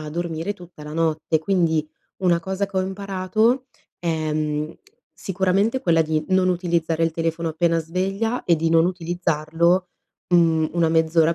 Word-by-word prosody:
a 155 -1 -6
dormire 170 +3 -3
tutta 175 -5 -14
la 150 0 -8
notte. 160 0 0
Quindi, 160 -3 +1 0.4
una 170 -2 +3
cosa 190 +3 -2
che 195 -1 -8
ho - - +3
imparato 200 +6 0 0.3
è, 160 -2 -1
mhmm, 150 0 -2 0.4
sicuramente 195 +5 0
quella 165 -5 +3
di 155 -1 -1
non 185 0 +3
utilizzare 170 -2 0
il 165 - 0
telefono 165 0 -2
appena 165 +1 +1
sveglia 195 +8 -2
e 170 - +3
di 165 +1 0
non 165 0 +4
utilizzarlo, 175 0 0 0.4
mhmm, 165 -2 +3
una 170 -1 +2
mezz'ora 160 0 +3
170 Hz, 155 wpm, -22 LUFS, 160-185 Hz, 0.4 s, non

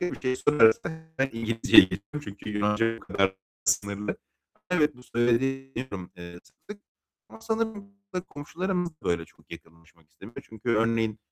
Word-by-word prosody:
bir 180 - -3
şey 130 -1 0
sorarsa 115 -7 +5 0.3
hemen 135 0 +1
İngilizceye 115 -2 +6
geçiyorum. 100 +10 -5
Çünkü 100 +1 -8
Yunanca 105 +2 +1
bu - - -14
kadarla 95 -1 0 0.3
sınırlı. 100 0 0 0.5
Evet, 150 -6 +2
bu 125 - -15
söylediğini 135 +3 0
deniyorum, 100 -8 -6
eee, 85 0 -9
sık - - -26
sık. 205 0 -9 0.5
Ama - - -14
sanırım 220 -2 -2 0.4
komşularımız 175 +4 -3
da 155 - -29
böyle 85 -1 0
çok - - -25
yakınlaşmak 85 -1 -15
istemiyor. 95 +9 -11
Çünkü 110 +2 -9
örneğin 115 -1 +1
115 Hz, 150 wpm, -27 LUFS, 100-145 Hz, 0.5 s, İngilizceye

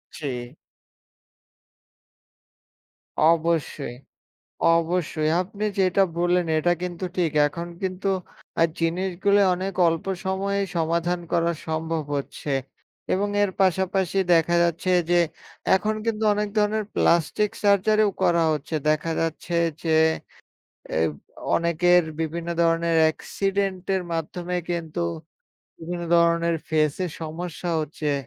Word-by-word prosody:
জী। 125 -3 -5 2.7
অবশ্যই, 160 -5 +1 0.8
অবশ্যই 165 -2 0
আপনি 200 +3 -6 0.2
যেটা 185 0 +3 0.2
বললেন 175 +1 +2
এটা 175 +3 +2
কিন্তু 180 +1 -4
ঠিক। 170 -3 +1 0.2
এখন 170 +3 -6
কিন্তু 190 +1 -3 0.5
আ - - +8 0.2
জিনিসগুলা 185 +4 +1
অনেক 190 +2 -4
অল্প 165 -1 -1 0.2
সময়েই 195 +1 0
সমাধান 170 +2 0
করা 170 0 +2 0.2
সম্ভব 160 0 -2
হচ্ছে। 140 +1 -5 0.6
এবং 200 +2 +1 0.2
এর 200 - 0
পাশাপাশি 190 0 +1 0.2
দেখা 170 +1 +3
যাচ্ছে 170 +2 0 0.2
যে, 175 - +5 0.6
এখন 215 +3 0
কিন্তু 220 -1 -1
অনেক 210 0 -1
ধরনের 210 +1 +2
প্লাস্টিক 170 +5 +2
সার্জারিও 210 +1 +4
করা 170 -1 +3
হচ্ছে। 155 +1 -3
দেখা 155 +2 +1
যাচ্ছে 165 +1 -3 0.3
যে 160 -2 +3 0.9
অ্যা - - 0 0.6
অনেকের 175 +1 +3 0.2
বিভিন্ন 165 +1 -3
ধরনের 165 0 +2
অ্যাক্সিডেন্টের 190 +3 -1
মাধ্যমে 175 +2 -3
কিন্তু 170 -1 -3 0.8
বিভিন্ন 175 +1 -5
ধরনের 170 0 +3
ফেসে 155 +2 +1 0.2
সমস্যা 170 +2 -5
হচ্ছে, 150 -1 -2
170 Hz, 105 wpm, -24 LUFS, 165-190 Hz, 2.7 s, আ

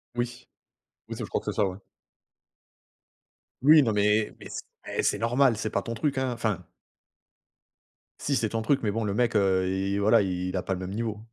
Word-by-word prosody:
Oui. 120 0 -4 0.6
Oui, - - -5
c'est - - -4
je - - -7
crois - - -1
que - - -3
c'est - - -8
ça. 105 - +3
Ouais. 95 +1 -6 1.8
Oui, 150 +2 +7
non 115 - +1
mais 105 +1 +2
mais - - -9
c - - -5 0.3
eh! - - 0
C'est - - +2
normal. 120 +1 +3
C'est 110 0 -2
pas 100 - -1
ton 115 - -5
truc, 135 +4 -1
hein, 130 -1 0
enfin 110 -7 -2 1.6
si, 140 - 0
c'est 110 -3 0
ton 115 0 -2
truc. 135 +5 +1
Mais 105 - +1
bon, 115 +2 -2
le 100 - -1
mec, 115 +1 +1
heu, 95 -2 +3
il 95 +1 -1
voilà, 105 +1 +5
il 90 -1 -2
a 90 - 0
pas 95 - -2
le 90 - -4
même 95 0 -5
niveau. 110 -1 -3
110 Hz, 210 wpm, -27 LUFS, 95-120 Hz, 1.8 s, Oui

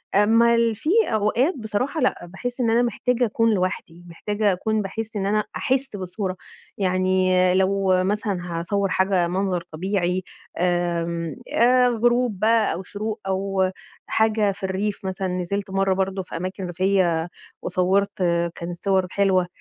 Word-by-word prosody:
أمّا 230 +3 +5
ال 230 -1 +2
في 225 +9 -4 0.2
أوقات 225 - +1
بصراحة 240 +7 -2
لأ، 250 -8 0
باحس 245 +8 -5
إن 230 - +2
أنا 230 +2 +3
محتاجة 245 +1 0
أكون 230 0 +2
لوحدي، 180 -2 -3
محتاجة 205 +4 -1
أكون 215 +3 -1
باحس 220 +3 -5
إن 195 -2 -1
أنا 210 +1 +1
أحس 265 -3 -1
بالصورة. 185 0 -4 0.4
يعني 185 -1 +1 0.3
لو 190 0 +2
مثلًا 205 0 -1 0.2
هاصوَّر 195 +3 -1
حاجة 190 -1 +2
منظر 185 0 -1
طبيعي، 180 +2 -2 0.3
آمم، 170 -3 -1 0.2
آآ 250 +1 +5
غروب 240 -2 +1
بقى 225 +1 +3
أو 180 - -5
شروق 210 +4 -5
أو 190 0 0 0.4
حاجة 220 -2 +2
في 195 - -12
الريف، 195 +1 -2
مثلًا 190 0 -2
نزلت 185 +2 -3
مرة 195 0 +2
برضه 190 0 -1
في - - -7
أماكن 185 +2 -4
ريفية 175 -2 +1 0.3
وصوَّرت، 190 +2 +1 0.4
كانت 175 +1 -7
صور 190 -2 +2
حلوة. 190 -3 +2
195 Hz, 145 wpm, -23 LUFS, 185-220 Hz, 0.4 s, أمّا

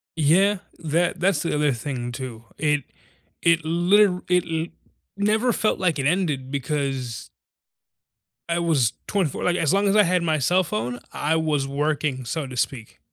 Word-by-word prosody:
Yeah, 180 +7 +3 0.2
that 170 +2 0
that's 180 -4 +2
the 165 - -1
other 150 -1 +2
thing 120 0 -4
too, 120 -3 -7
it 150 -2 +1 0.6
it 170 -1 +3
liter 180 +3 +3
it 180 -1 +3
l 160 0 -2 0.5
never 215 +4 +2
felt 215 -1 0
like 175 -5 +1
it 140 - -2
ended, 150 -6 0
because 135 -4 -3 1.2
I 170 0 +1
was 150 -9 +2 0.2
24 185 -9 -1
like, 180 - +2
as 165 -1 +1
long 200 +1 +2
as 195 - +2
I 210 - +7
had 180 -1 +2
my 160 -2 +1
cell 180 +8 +3
phone, 120 -1 -3
I 155 +2 0
was 150 -3 0
working, 145 -2 -1
so 155 +3 -3
to 130 -2 -8
speak. 115 -2 -3
155 Hz, 165 wpm, -23 LUFS, 135-180 Hz, 1.2 s, I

